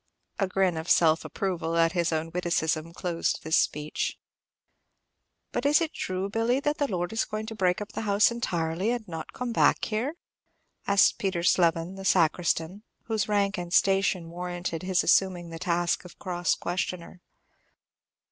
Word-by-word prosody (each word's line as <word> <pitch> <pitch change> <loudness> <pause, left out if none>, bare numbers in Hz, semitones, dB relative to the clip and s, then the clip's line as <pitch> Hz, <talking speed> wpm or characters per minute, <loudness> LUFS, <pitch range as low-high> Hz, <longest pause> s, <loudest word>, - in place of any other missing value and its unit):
A 195 - +2
grin 185 -2 +1
of 160 +2 -5
self 160 -1 +4
approval 170 -4 -2
at 165 0 +4
his 170 -1 0
own 160 +1 -2
witticism 165 -2 -1
closed 170 0 -2
this 160 +1 +1
speech. 150 +1 -1 1.3
"But 245 - -2
is 290 +1 +5
it 330 -2 -2
true, 185 +1 -3
Billy, 225 +5 +1
the 295 +1 0 0.2
lord 175 0 -2
is 225 - +1
going 215 0 -5
to 225 - -6
break 185 -2 +1
up 210 - -7
house 205 0 +3
entirely, 175 -4 -1
and 240 -3 -2
not 165 -2 -7
come 250 -2 -4
back - - +3
here?" 240 +8 -2 0.7
asked 200 -1 +4
Peter 185 -4 -1
Slevin, 170 +1 +2
the 195 - -7
sacristan, 170 +1 +1 0.2
whose 220 -3 -1
rank 200 -2 +1
and 175 -1 -6
station 190 -3 +2
warranted 175 -1 -4
his 185 -1 +1
assuming 180 -3 +2
the 165 - -7
task 175 0 0
of 180 - -13
cross 175 -2 -1
questioner. 175 0 -4
180 Hz, 155 wpm, -27 LUFS, 170-200 Hz, 1.3 s, is